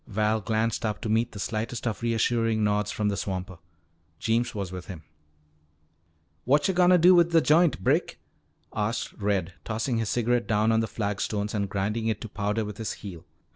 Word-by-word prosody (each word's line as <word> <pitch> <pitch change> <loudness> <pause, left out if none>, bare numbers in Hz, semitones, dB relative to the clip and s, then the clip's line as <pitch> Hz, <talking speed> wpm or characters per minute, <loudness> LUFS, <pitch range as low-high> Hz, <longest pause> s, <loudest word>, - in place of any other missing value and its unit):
Val 110 0 0
glanced 110 +3 -1
up 105 -2 -2
to 115 - -5
meet 115 +2 +1
the - - -10
slightest 110 +4 -3
of 115 -1 -2
reassuring 115 -1 +1
nods 105 0 +1
from 105 0 -1
the 100 - -1
swamper. 95 -2 -4 0.6
Jeems 115 +4 0
was 100 -3 -4
with 90 -1 -7
him. 90 -5 -8 1.4
"Whatcha 145 +8 +3
gonna 180 0 +5
do 180 +2 +7
with 170 -1 +5
the 165 -1 +5
joint, 155 - +3
Brick?" - - +1 0.6
asked 105 +2 -2
Red, 100 -4 -1
tossing 115 +2 -1
his 110 -3 -1
cigarette 120 0 +1
down 110 +1 +2
on 110 - +3
the 115 - 0
flagstones 105 -1 -2
and 100 -2 -1
grinding 105 +4 -1
it 110 -2 0
to - - -5
powder 105 +2 -1
with 105 0 -7
his 110 - -3
heel. 90 -4 -9
110 Hz, 180 wpm, -26 LUFS, 105-115 Hz, 1.4 s, do